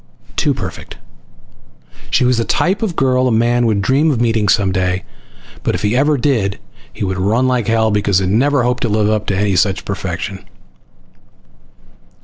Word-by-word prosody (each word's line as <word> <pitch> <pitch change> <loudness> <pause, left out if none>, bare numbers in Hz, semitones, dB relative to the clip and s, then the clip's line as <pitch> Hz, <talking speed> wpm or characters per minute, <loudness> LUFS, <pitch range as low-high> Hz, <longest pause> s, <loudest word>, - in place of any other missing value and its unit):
Too - - +1
perfect. - - -7 1.1
She - - +2
was 125 -1 +2
the - - +1
type 190 - 0
of 205 -7 -2
girl 130 -1 +2
a - - +1
man 120 +1 +2
would 100 -3 0
dream 140 +8 +2
of 135 -6 0
meeting 115 -3 +1
some 95 -1 +2
day, 90 -1 -1 0.6
but - - -1
if - - -5
he 105 +3 +1
ever 145 +3 +2
did 115 -8 0 0.3
he - - -6
would 95 0 -3
run 110 +7 +1
like 125 -5 0
hell 110 -1 +2
because 105 -2 +1
he 95 - +1
could 95 - -1
never 140 +3 +2
hope 125 0 0
to 120 - -1
live 105 0 +1
up 105 -1 -1
to 100 0 0
such 95 +1 +1
perfection. 95 0 -5
110 Hz, 180 wpm, -16 LUFS, 100-125 Hz, 1.1 s, She